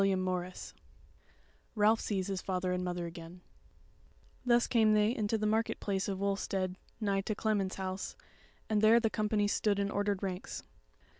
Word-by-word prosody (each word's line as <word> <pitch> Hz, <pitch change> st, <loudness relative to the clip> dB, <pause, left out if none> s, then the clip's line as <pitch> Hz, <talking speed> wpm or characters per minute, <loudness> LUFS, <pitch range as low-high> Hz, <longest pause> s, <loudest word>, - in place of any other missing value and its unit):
CHAPTER 195 Hz, -1 st, +3 dB
26 185 Hz, -1 st, -3 dB, 1.0 s
Ralph 215 Hz, +1 st, +4 dB
Sees 195 Hz, -3 st, -1 dB
His 195 Hz, -1 st, -3 dB
Father 185 Hz, -1 st, -1 dB
and 180 Hz, 0 st, -1 dB
Mother 175 Hz, -1 st, -2 dB
Again 170 Hz, +1 st, -9 dB, 1.0 s
Thus 240 Hz, -1 st, +4 dB
came 220 Hz, -3 st, +4 dB
they 210 Hz, +3 st, +3 dB
into 215 Hz, +1 st, 0 dB
the 215 Hz, -, -1 dB
market 220 Hz, +2 st, +1 dB
place 195 Hz, -2 st, -1 dB
of 195 Hz, -2 st, -2 dB
Wulstead 195 Hz, -2 st, -1 dB, 0.2 s
nigh 200 Hz, -3 st, +1 dB
to 210 Hz, +2 st, -2 dB
Clement's 205 Hz, -3 st, 0 dB
house, 190 Hz, 0 st, -4 dB, 0.5 s
and 215 Hz, -2 st, +1 dB
there 220 Hz, +2 st, +7 dB
the 225 Hz, -2 st, 0 dB
company 210 Hz, -1 st, +1 dB
stood 205 Hz, 0 st, +1 dB
in 200 Hz, 0 st, 0 dB
ordered 205 Hz, -1 st, 0 dB
ranks. 185 Hz, -1 st, -4 dB
200 Hz, 160 wpm, -32 LUFS, 185-215 Hz, 1.0 s, there